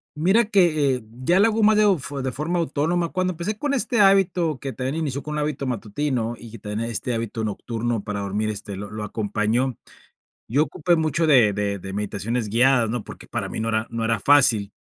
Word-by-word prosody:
Mira 190 +9 +3
que, 155 -10 +3
eh, 125 - -7
ya 130 +10 +1
le 215 - +6
hago 220 0 0
ma 215 0 +5
deo 205 -4 +4
fu 140 0 -4
de 130 - -1
forma 155 +7 -2
autónoma, 165 +2 0
cuando 185 0 -1
empecé 180 +6 -4
con 290 +2 -1
este 240 -2 0
hábito, 180 -6 +3
que 135 -1 -5
también 130 +3 -3
inició 140 -4 -2
con 150 - -6
un 150 - -2
hábito 145 -2 -2
matutino, 120 +1 -2
y 115 -2 -12
que 115 - -10
tenía 105 +3 -4
este 120 +1 -3
hábito 115 0 -3
nocturno 115 +1 -3
para 105 -1 -4
dormir, 105 +2 -2
este, 105 -1 -5
lo 100 +1 -7
lo 105 0 -6
acompañó, 110 +4 -1 0.7
yo 140 +7 +2
ocupé 170 +3 0
mucho 160 0 0
de 120 -8 +5
de 100 -1 -2
de 95 +1 -7
meditaciones 105 +3 -2
guiadas, 120 +1 +3
¿no? 115 -2 -3
Porque - - -11
para - - -4
mí - - -5
no 110 - -2
era 110 0 0
no 115 -1 -3
era 115 -2 +1
fácil. 120 -8 +4
130 Hz, 215 wpm, -23 LUFS, 110-160 Hz, 0.7 s, le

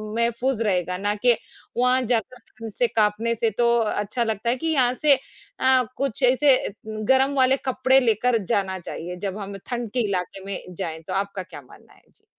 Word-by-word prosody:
मैफ़ूज़ 235 +1 0
रहेगा 180 -3 0
ना 205 +2 0
कि 240 +3 +3 0.4
वहाँ 250 +1 +3
जाकर 240 +2 -1
ठंड 225 0 -9
से 240 +3 +1
काँपने 220 +1 +1
से 225 0 +1
तो 240 -1 +3
अच्छा 215 +2 -1
लगता 220 0 -2
है 245 - +2
कि 325 +6 -4
यहाँ 255 -6 +3
से 295 - +7 0.5
अ, 260 -1 +4
कुछ 275 -2 -2
ऐसे 260 +2 +5 0.3
गर्म 265 +6 +2
वाले 265 0 +4
कपड़े 260 +1 +3
लेकर 235 0 +2
जाना 190 -2 -1
चाहिए। 175 0 -6
जब 195 +2 -5
हम 200 -1 -6
ठंड 240 -3 -3
के 250 - -1
इलाके 190 0 -3
में 200 -1 -4 0.2
जाएँ, 165 -3 -5
तो 160 - -7
आपका 195 -1 -2
क्या 175 -5 -11
मानना 125 - -19
है? - - -24
जी। - - -26
230 Hz, 190 wpm, -24 LUFS, 200-255 Hz, 0.5 s, से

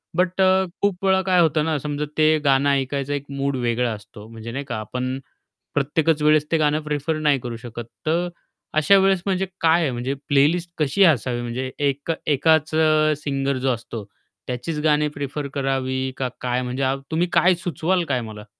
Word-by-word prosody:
But 185 +1 +1
अ, 190 0 +4 0.2
खूप 195 -2 0
वेळा 190 0 +4
काय 180 -1 +4
होतं 155 -2 +2
ना, 160 -1 0
समजा 150 0 -2
ते 155 0 +5 0.2
गाणं 135 +1 +4
ऐकायचं 140 0 -1
एक 140 -1 -3
मूड 140 0 -1
वेगळा 120 0 +1
असतो, 105 0 -11
म्हणजे 115 0 -8
नाही 140 +4 -4
का, 120 -3 -4
आपण 125 +4 -4 0.6
प्रत्येकच 150 +2 +1
वेळेस 150 0 +4
ते 165 - +3
गाणं 150 -1 +2
प्रिफर 150 +1 -2
नाही 140 -2 +4
करू 120 -1 -6
शकत. 120 0 -7 0.2
तर 170 +3 +1 0.5
अशा 175 +6 +5
वेळेस 195 -1 +3
म्हणजे 190 -1 0 0.2
काय 165 +1 +4
आहे, 150 -5 0
म्हणजे 125 +2 -2
प्लेलिस्ट 160 +4 +2
कशी 150 +6 +3
असावी 120 -1 -3
म्हणजे 125 +2 -4 0.2
एक 140 +4 -3 0.2
एकाच 160 +2 +2
अ, 155 -1 +4
सिंगर 140 -1 -1
जो - - +3
असतो, 115 -2 -7 0.4
त्याचीच 140 +5 -3
गाणे 150 -1 +3
प्रिफर 145 +1 -4
करावी 130 -1 -1
का 130 -1 -1
काय 125 0 0
म्हणजे 130 +2 -1 0.2
तुम्ही 170 +3 +1
काय 180 +2 +5
सुचवाल 175 +2 0
काय 125 - 0
मला? 105 -1 -10
145 Hz, 180 wpm, -22 LUFS, 130-160 Hz, 0.6 s, ते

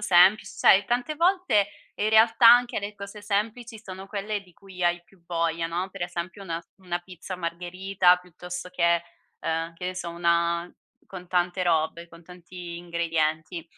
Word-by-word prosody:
semplic 195 0 +5
sai 195 +1 +4
tante 245 +7 -1
volte 340 - +2 0.3
in 215 - 0
realtà 225 +1 +6
anche 245 -2 +4
le 205 +1 -5
cose 200 +1 -9
semplici 220 +3 -2
sono 190 -2 -9
quelle 205 0 -3
di 185 -2 -20
cui 190 -2 -10
hai 175 0 +2
più 180 -1 -25
voglia, 165 -1 -1
no, 175 +3 -2
per - - -7
esempio 175 +3 -5
una 165 -3 -4
s - - -27
una 175 -2 -3
pizza 180 +1 -9
margherita 180 +2 +1
piuttosto 180 +1 -8
che, 170 -1 +2 0.4
uhm, 165 +1 -2
che 180 - -8
ne 185 - -3
so, 185 -2 -5
una, 170 0 +1 0.4
con 180 -2 -10
tante 180 0 +1
robe, 170 0 0
con 170 0 -16
tanti 180 -1 -9
ingredienti. 165 -1 -1
180 Hz, 165 wpm, -26 LUFS, 170-200 Hz, 0.4 s, realtà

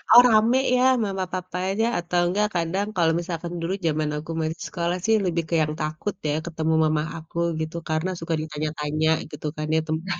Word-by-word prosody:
"Oh 240 - +12
rame 230 +2 +4 0.2
ya 250 - +3 0.2
mama 195 -2 -2
papanya," 185 +3 -1
atau 175 0 0
enggak 205 +4 +2
kadang 180 +5 0
kalau 165 -3 +3
misalkan 170 -1 -4
dulu 170 +3 -1
zaman 155 -1 +1
aku 155 +2 -6
masih 160 +1 -3
sekolah 175 0 -1
sih, 225 0 +4
lebih 170 -2 0
ke - - -3
yang 150 0 0
takut 155 +6 -2
ya, 145 - +1
ketemu 160 -1 -1
mama 155 0 +1 0.2
aku 165 +1 -10 0.2
gitu. 160 +1 -4
Karena 155 +3 0
suka 165 0 -3
ditanya-tanya 155 0 -1 0.2
gitu - - -8
kan 155 0 -3
ya, - - +4
tentang 175 +3 -2
170 Hz, 190 wpm, -24 LUFS, 155-185 Hz, 0.2 s, Oh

